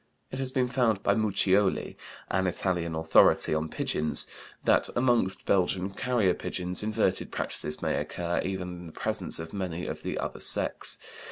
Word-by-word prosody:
It 130 - -5
has 135 -1 +1
been 130 -1 +1
found 120 -5 +1
by 100 - +3
Muccioli, 100 -2 +1 0.4
an 95 +1 +1
Italian 90 -2 -1
authority 80 -1 +4
on 80 0 -1
pigeons, 75 -1 +1 0.4
that - - +4
among 120 -5 +3 0.2
Belgian 95 0 +1
carrier 110 -3 +1
pigeons 90 0 -1
inverted 105 0 0
practices 75 - -1
may - - 0
occur, 85 0 -2
even 95 -1 -3
in 90 -1 -9
the 80 - -12
presence - - -1
of 80 0 -7
many 90 -3 -4
of - - -5
the - - -4
other - - -4
sex. - - +2
95 Hz, 160 wpm, -28 LUFS, 85-105 Hz, 0.4 s, authority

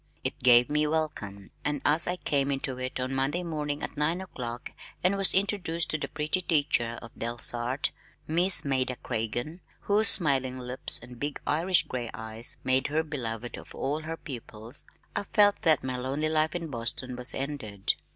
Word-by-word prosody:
It - - -3
gave 120 0 +6
me 150 +1 +1
welcome, 150 -11 -3
and 150 -1 -1
as 155 +3 +4
I 180 - 0
came 140 -5 -1
into 135 -2 -3
it 130 0 -4
on 130 +1 -2
Monday 135 +7 0
morning 150 -3 -3
at - - -5
nine 155 +4 0
o'clock 125 -10 -7 0.3
and 185 +2 +3
was 195 -1 +4
introduced 185 -4 0
to 155 - -1
the - - -3
pretty 155 +5 -2
teacher 140 -8 +1
of 115 - -11
Delsarte, 120 +3 -2 0.3
Miss 170 +1 +3
Maida 130 -2 +1
Craigen, 120 +9 -3 0.2
whose 210 +1 +3
smiling 135 -8 +6
lips 125 0 +6
and 120 0 -12
big 145 0 -3
Irish 165 +2 +3
gray 120 -2 -5
eyes 110 +1 -2
made 130 0 +2
her 155 +2 0
beloved 120 -6 -4
of - - -13
all 145 +3 -2
her 160 +1 -6
pupils, 120 -3 -8 0.3
I - - 0
felt 205 0 +3
that 160 -4 +4
my 130 -1 -3
lonely 135 +5 -1
life 155 +1 +1
in 170 -2 -4
Boston 125 +1 -4
was 125 0 +1
ended. 130 -8 -2
140 Hz, 175 wpm, -28 LUFS, 125-160 Hz, 0.3 s, gave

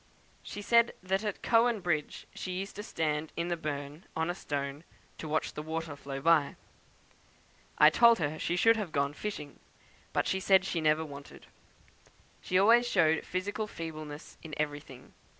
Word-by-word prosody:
She 205 - -8
said 235 +2 +4
that 190 +2 0
at 210 -2 -4
Cowan 235 -1 +3
Bridge 155 -5 -2
she 185 - -5
used 195 +2 -5
to - - -4
stand 155 -6 -2
in 170 +1 -1
the 175 - +1
burn, 150 0 -5
on 160 +2 0
a - - -3
stone, 145 -3 -4 0.4
to 155 - -5
watch 155 +1 -1
the 150 - -5
water 160 -1 -4
flow 140 -1 -6
by. 155 -1 +3 1.2
I - - +8
told 235 -1 +6
her 155 -1 -2
she 175 - -1
should 225 +5 +5
have 200 -7 -3
gone 140 0 0
fishing; 150 -5 -6 0.7
she 190 - 0
said 190 0 +4
she 170 -3 -1
never 155 +1 +2
wanted. 140 -1 -11 1.0
She 185 - 0
always 230 +5 +5
showed 160 -7 +3
physical 205 +4 -3
feebleness 155 -4 -8
in 155 -3 -8
everything. 145 -4 -5
165 Hz, 165 wpm, -30 LUFS, 150-195 Hz, 1.2 s, I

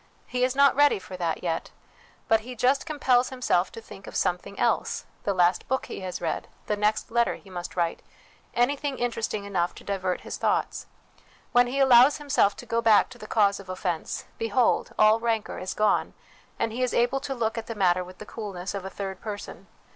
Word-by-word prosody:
He 250 0 -1
is 255 +1 +1
not 280 0 +5
ready 290 -2 +5
for 190 -1 -9
that 170 -2 -2
yet; 165 -2 -2 0.6
but 225 - +4
he 250 +3 -9
just 265 +6 +2
compels 260 -5 +2
himself 250 -8 0
to - - -7
think 200 -3 -12
of - - -9
something 180 +3 -1
else - - 0 0.2
the 200 - +1
last 175 0 +2
book 265 -1 -1
he - - -7
has 185 -2 -5
read, 165 -2 -3 0.2
the 210 - 0
next 210 +2 0
letter 235 0 +2
he 195 - -15
must 175 -1 -6
write, 170 -2 -1 0.5
anything 275 +3 +1
interesting 230 -3 -2
enough 180 -3 -1
to - - -12
divert 190 -2 -2
his - - -6
thoughts. - - -1 0.6
When 245 0 +5
he 255 +3 -3
allows 265 +1 +7
himself 280 -9 +2
to - - -10
go 230 0 0
back 225 -2 +5
to 250 -2 -13
the 215 - -9
cause 200 -3 +2
of 195 -1 -12
offence, 185 -3 -3
behold, 225 +2 +1
all 215 +1 +5
rancour 225 -2 -1
is 185 - -4
gone, 210 -1 +1 0.4
and 225 - -1
he 240 +3 -4
is 255 - 0
able 245 +3 +2
to 270 0 -4
look 225 -2 -1
at 230 -1 -5
the 230 - -5
matter 185 -3 +2
with 180 +1 -12
the - - -9
coolness 195 -4 -6
of 200 -2 -4
a 190 - -5
third 195 -1 -6
person. 205 -2 -7
215 Hz, 205 wpm, -26 LUFS, 190-245 Hz, 0.6 s, allows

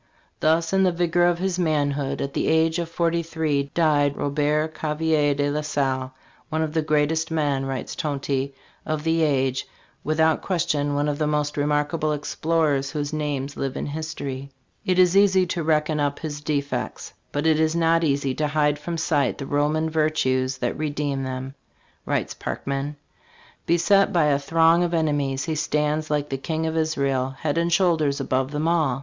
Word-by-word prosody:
"Thus 165 +2 +2
in 195 - +4
the 185 -1 +4
vigor 175 0 +2
of 175 -1 +2
his 185 0 -1
manhood, 145 -4 0
at 140 0 -5
the - - -1
age 160 +1 +2
of 170 -1 -3
forty 170 0 0
three, 155 -4 -1
died 145 -4 +2
Robert 150 +2 0
Gavelier 155 -1 +1
de 145 0 0
la 150 +1 -1
Salle, 135 -3 -1 0.2
' - - -32
one 160 0 0
of 155 -1 -3
the 160 - +2
greatest 155 +1 +1
men,' 145 -4 0
writes 135 -1 -4
Tonty, 140 -2 -2 0.3
'of 155 -1 -3
the 165 0 +1
age'; 135 -4 +1 0.4
without 160 +1 +2
question 145 -5 0
one 145 +1 +1
of 145 0 -2
the 155 - +1
most 150 -1 0
remarkable 150 +1 0
explorers 150 -2 0
whose 145 0 -3
names 145 -2 -2
live 135 -1 -3
in - - -3
history." 140 -3 -5 0.4
"It 185 -1 +2
is 180 0 +5
easy 190 -2 +5
to 175 -1 -3
reckon 155 -1 +1
up 145 -1 0
his 145 -2 -5
defects, 145 -2 -3 0.2
but 145 +2 -2
it 160 -1 +4
is 160 +1 +2
not 165 0 +3
easy 140 -3 +1
to 150 +3 -1
hide 150 0 +1
from 170 +2 -4
sight 145 -5 +1
the 140 - -5
Roman 150 +3 +1
virtues 135 -5 0
that 125 +1 -2
redeemed 145 -3 -2
them," 130 +1 -5 0.5
writes - - -1
Parkman. 140 +2 -4 0.7
"Beset 195 +4 +4
by 170 -3 +3
a 145 -2 +3
throng 165 +4 +3
of 175 -1 0
enemies, 145 -4 0
he 160 - -1
stands, 150 0 0
like 150 -1 -1
the 135 - -2
King 160 +3 -2
of 160 0 -2
Isarel, 140 -5 0
head 150 +3 -1
and 170 +1 0
shoulders 160 -6 +2
above 130 0 0
them 150 +2 -2
all. 155 -7 +1
150 Hz, 180 wpm, -24 LUFS, 140-160 Hz, 0.7 s, is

